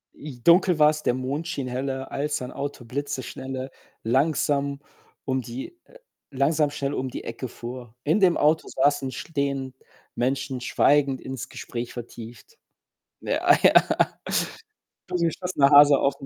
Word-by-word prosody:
J 130 -5 -10
„Dunkel 175 -1 +5
war's, 150 0 +4
der 120 - +2
Mond 140 +6 -3
schien 140 -6 -3
heller, 130 +1 -4
als 150 0 -2
ein 125 - -6
Auto 140 -3 -6
blitzeschnelle, 130 0 -5 0.3
langsam 140 +2 +1 0.5
um 130 -1 0
die 125 - -8 0.5
langsam 145 +2 +1
schnell 140 -1 -3
um 130 -1 -2
die - - -7
Ecke 115 +3 -5
fuhr. 120 0 -9
In 160 +8 +2
dem 185 -4 +4
Auto 155 +2 +2
saßen, 135 -1 +1
stehend 140 -2 -3 0.4
Menschen 130 +1 -1
schweigend 140 +1 +2
ins 130 -2 -6
Gespräch 120 0 -6
vertieft.“ 120 - -10 0.6
Ja, - - +3
ja. - - +6 1.3
Totgeschossener 170 -3 +1
Hase 145 0 +8
aufm 140 0 -1
140 Hz, 130 wpm, -25 LUFS, 130-150 Hz, 1.3 s, Hase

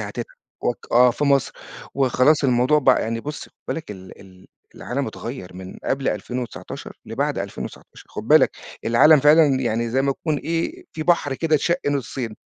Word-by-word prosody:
هتتعب - - -5 0.4
وك" 120 - -2
آه 125 +1 +6
في 145 +5 -2
مصر 140 -2 +2 0.4
وخلاص 135 +3 +3
الموضوع 130 +3 +3
بقى 135 - +3
يعني 115 +1 -3
بُص 150 +2 -6
خد - - -20 0.2
بالك 160 -9 -4
ال 95 -2 -11
ال 95 -1 -17 0.3
العالم - - -3
اتغيَّر 90 0 -7
من 95 0 -9
قبل 135 0 -1
2019 125 -2 -5
لبعد - - -2
2019 - - -8
خد - - -8
بالك - - +5 0.3
العالم 140 +6 +6
فعلًا 150 +2 +6
يعني 115 -1 -1
زي 130 +3 +1
ما 140 - +1
يكون 150 +1 -2
إيه، 170 - -3
في 155 - -4
بحر 155 -5 +2
كده 160 +2 0
اتشق 170 +3 +1
نُصِّين 130 -5 -3
135 Hz, 170 wpm, -22 LUFS, 115-150 Hz, 0.4 s, آه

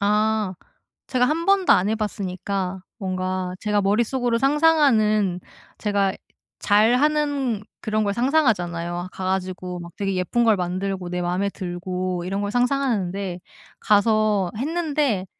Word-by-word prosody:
아. 210 -1 +1 0.5
제가 250 -1 +2
한번도 355 +6 +3
안 185 +3 +3
해 220 - +1
봤으니까 195 -3 -3 0.2
뭔가 185 -1 -3
제가 210 -1 +1
머릿속으로 230 +4 +1
상상하는 265 - +3 0.4
제가 200 -2 0 0.4
잘하는 255 +2 +2 0.2
그런 215 0 0
걸 200 -1 0
상상하잖아요. 180 - 0
가 185 - -6
가지고 185 -1 -3
막 170 -1 -9
되게 195 -1 -1
예쁜 210 +7 0
걸 220 -3 +4
만들고 185 +1 -3
내 180 0 -2
맘에 180 +3 0
들고 180 -1 -4
이런 195 +2 -2
걸 205 - -2
상상하는데 210 -8 0 0.4
가서 210 -2 +2
했는데 290 - 0
205 Hz, 275 characters per minute, -23 LUFS, 185-240 Hz, 0.5 s, 걸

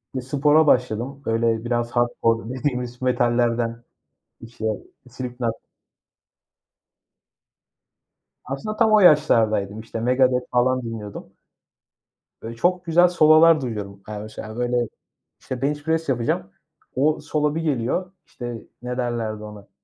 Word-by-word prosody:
Bir 130 - -1
spora 145 +4 +3
başladım, 125 +2 +1
böyle 115 0 0
biraz 120 0 -1
hardcore 115 -2 0
dediğimiz 125 -2 -3
metallerden 120 -2 +1 0.6
işte 115 -1 -8 0.4
Slipknot. 125 -2 -4 2.9
Aslında 135 +12 -4
tam 220 -1 +4
o 215 - +7
yaşlardaydım. 110 - +4
İşte 115 0 -6
Megadeth 125 +1 +2
falan 130 +1 +2
dinliyordum. 115 -4 -7 1.1
Böyle, 115 +1 -7
çok 180 +8 0
güzel 175 +2 +5
sololar 160 -1 +6
duyuyordum. 100 -5 -6
Yani 105 -1 -6
mesela, 110 0 -8
böyle 120 -1 0 0.5
işte 130 -1 -6
bench 145 +1 -1
press 160 -1 -1
yapacağım, 115 -6 -1 0.4
o 150 +4 +2
solo 150 0 -1
bir 165 - -1
geliyor. 155 +5 -1
İşte, 120 -2 -7 0.2
ne 125 0 -4
derlerdi 115 -4 -3
ona? 105 -1 -11
125 Hz, 115 wpm, -23 LUFS, 115-145 Hz, 2.9 s, o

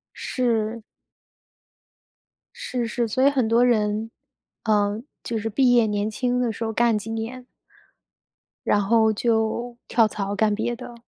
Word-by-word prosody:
是。 230 -3 -1 1.7
是 255 - -3
是， 230 +1 -1
所 255 +5 +2
以 - - +6
很 260 -5 +1
多 235 +2 +4
人， 215 -1 +1 0.5
呃， 210 0 +1 0.2
就 230 -1 -3
是 225 - -3
毕 250 +3 +3
业 235 -2 +5
年 210 0 -1
轻 250 +2 -1
的 240 -2 0
时 225 - -5
候 225 - -2
干 235 0 +2
几 215 +2 -7
年。 235 +3 -5 1.2
然 205 - +3
后 220 +2 +3
就 230 +2 -1
跳 225 -2 +4
槽 200 -1 -3
干 210 +1 +2
别 230 +3 -2
的。 245 0 -9
225 Hz, 155 characters per minute, -24 LUFS, 215-240 Hz, 1.7 s, 以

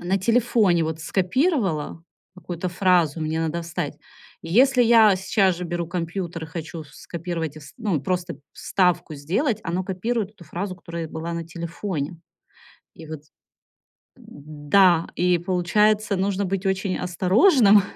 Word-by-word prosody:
на 185 +3 0
телефоне 215 -4 +2
вот 160 0 -4
скопировала, 185 - 0 0.3
какую-то 180 -1 -5
фразу 175 -4 +2
мне 155 +1 -1
надо 165 +1 -2
вставить. 165 0 -4 0.5
И - - -8
если 255 +3 +5
я 225 -4 +6
сейчас 190 -2 +1
же 180 - -5
беру 170 0 -3
компьютер 170 -1 -4
и - - -9
хочу 165 0 -7
ф 150 - -16
скопировать 165 -3 -5
и - - -9
вст 145 0 -14
ну, 205 -8 0
просто 180 -2 -2 0.2
вставку 175 -3 0
сделать, 200 - -1
оно 175 +2 -1
копирует 205 +3 -2
эту 200 -5 -16
фразу, 185 +4 -5
которая 170 -2 -6
была 160 +2 -5
на 170 0 -4
телефоне. 170 -1 -5 0.8
И 160 - -12
вот 155 -2 -7 0.9
Да, 155 +4 +1
и 180 0 +3
получается, 205 +4 +1
нужно 195 +1 0
быть 195 +1 -2
очень 190 0 0
осторожным, 200 - +4
180 Hz, 145 wpm, -23 LUFS, 165-200 Hz, 0.9 s, я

